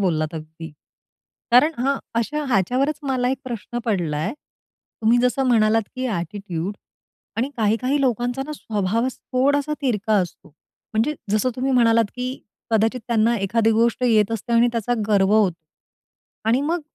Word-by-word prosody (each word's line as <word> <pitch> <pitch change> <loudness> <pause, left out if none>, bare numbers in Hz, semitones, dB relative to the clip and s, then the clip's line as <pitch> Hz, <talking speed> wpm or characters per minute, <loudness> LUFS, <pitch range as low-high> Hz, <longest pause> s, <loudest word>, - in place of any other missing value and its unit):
बोललात 160 -4 0
अगदी. 160 +1 -8 0.8
कारण 255 +7 +6
हां, 275 +3 +1 0.2
अशा 295 +7 -1
ह्याच्यावरच 255 +7 +1
मला 260 -3 0
एक 265 - -2
प्रश्न 240 -1 -5
पडलाय 165 -8 -1
तुम्ही 235 -5 -3
जसं 250 +2 +1
म्हणालात, 225 -1 +4
की 255 0 -2
ॲटिट्यूड 190 -2 -4 0.6
आणि 250 +5 -1
काही, 220 -1 +2
काही 275 +3 +1
लोकांचा 245 0 0
ना 305 - -5
स्वभावात 220 +2 -1 0.2
थोडासा 285 +3 +2
तिरका 220 -5 0
असतो. 175 -3 -6 0.5
म्हणजे 230 +8 +1 0.2
जसं 215 +4 +2
तुम्ही 265 +1 0
म्हणालात, 230 -2 +4
की 255 +1 -4 0.3
कदाचित 225 +3 +2
त्यांना 230 0 +3
एखादी 220 +3 +2
गोष्ट 230 +2 +1
येत 215 -3 +3
असते 225 +2 -3
आणि 235 +1 +5
त्याचा 235 +1 0
गर्व 200 -1 +3
होतो. 200 -6 +3 0.9
आणि 240 +4 +3
मग 330 +4 -1
230 Hz, 145 wpm, -22 LUFS, 210-255 Hz, 0.9 s, कारण